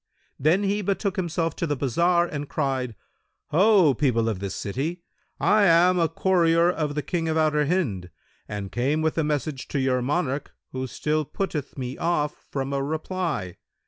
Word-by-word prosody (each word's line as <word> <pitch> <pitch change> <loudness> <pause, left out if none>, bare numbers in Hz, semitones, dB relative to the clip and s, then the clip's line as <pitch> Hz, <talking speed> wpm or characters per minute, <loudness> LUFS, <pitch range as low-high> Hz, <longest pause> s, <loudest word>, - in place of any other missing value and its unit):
Then 165 +8 +3
he 200 +1 0
betook 200 0 -1
himself 170 -3 -1
to 170 - -1
the 145 - 0
bazar 170 +7 +2
and 145 -4 -5
cried, 130 -5 -1 0.6
"Ho, 185 -2 +5
people 115 -4 +1
of 110 -5 -1
this 100 0 -4
city, 155 - -3 0.4
I 210 -1 +4
am 180 +1 +5
a 165 -2 +2
courier 170 -1 +3
of 150 -4 -2
the 150 - -1
King 165 -3 -2
of 160 - 0
Outer 150 -2 +2
Hind 115 - -1 0.4
and 100 -2 -5
came 140 +6 0
with 160 - +1
a - - +2
message 150 -2 -2
to 140 - -2
your 130 -1 +1
monarch 140 +1 -2 0.2
who 130 0 -3
still 155 +4 -1
putteth 150 -2 -4
me 130 0 -5
off 150 -3 -1
from 135 0 -3
a 140 - 0
reply. 155 - -3
155 Hz, 175 wpm, -25 LUFS, 135-175 Hz, 0.6 s, Ho